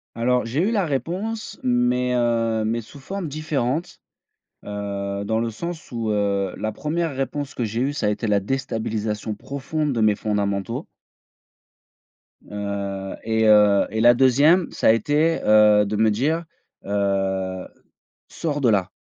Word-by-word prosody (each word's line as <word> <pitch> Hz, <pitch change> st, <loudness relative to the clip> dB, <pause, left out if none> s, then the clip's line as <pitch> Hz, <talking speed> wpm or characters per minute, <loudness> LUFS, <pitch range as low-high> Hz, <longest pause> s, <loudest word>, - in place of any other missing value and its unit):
Alors, 125 Hz, +2 st, +1 dB
j'ai 125 Hz, +7 st, -1 dB
eu -, -, 0 dB
la 205 Hz, -5 st, +1 dB
réponse 180 Hz, -, -3 dB
mais, 125 Hz, 0 st, +1 dB
heu, 115 Hz, -2 st, +1 dB
mais 115 Hz, +2 st, -1 dB
sous 115 Hz, +6 st, -14 dB
formes 190 Hz, +5 st, -5 dB
différentes, 155 Hz, +2 st, -2 dB, 0.6 s
heu, 100 Hz, -1 st, -4 dB
dans 110 Hz, +2 st, 0 dB
le 115 Hz, -, -1 dB
sens 165 Hz, +8 st, -7 dB
où, 115 Hz, -2 st, -2 dB
heu, 100 Hz, -2 st, 0 dB
la 110 Hz, -, -2 dB
1re 160 Hz, +5 st, -2 dB
réponse 135 Hz, +1 st, -3 dB
que 120 Hz, -, -3 dB
j'ai 110 Hz, +2 st, -2 dB
eue, 140 Hz, +3 st, 0 dB
ça 140 Hz, -, -2 dB
a -, -, +3 dB
été 105 Hz, +2 st, -2 dB
la 105 Hz, -1 st, +3 dB
déstabilisation 110 Hz, -3 st, -3 dB
profonde 140 Hz, +6 st, -3 dB
de 115 Hz, -, -2 dB
mes 105 Hz, -1 st, +4 dB
fondamentaux. 100 Hz, -2 st, -2 dB, 1.6 s
Heu, 100 Hz, -1 st, -4 dB
et 110 Hz, 0 st, +1 dB
heu, 105 Hz, -2 st, +5 dB
et 110 Hz, -, -3 dB
la 120 Hz, +1 st, +7 dB
2e, 140 Hz, +8 st, +4 dB
ça -, -, 0 dB
a -, -, +8 dB
été, 150 Hz, +8 st, +2 dB
heu, 105 Hz, -1 st, +6 dB
de 105 Hz, +1 st, -2 dB
me 110 Hz, +1 st, +4 dB
dire, 155 Hz, +10 st, 0 dB, 0.4 s
heu: 95 Hz, -2 st, -1 dB, 0.6 s
«Sors 145 Hz, -3 st, -3 dB
de 125 Hz, -, +4 dB
là, 100 Hz, -3 st, +1 dB
115 Hz, 155 wpm, -23 LUFS, 105-140 Hz, 1.6 s, a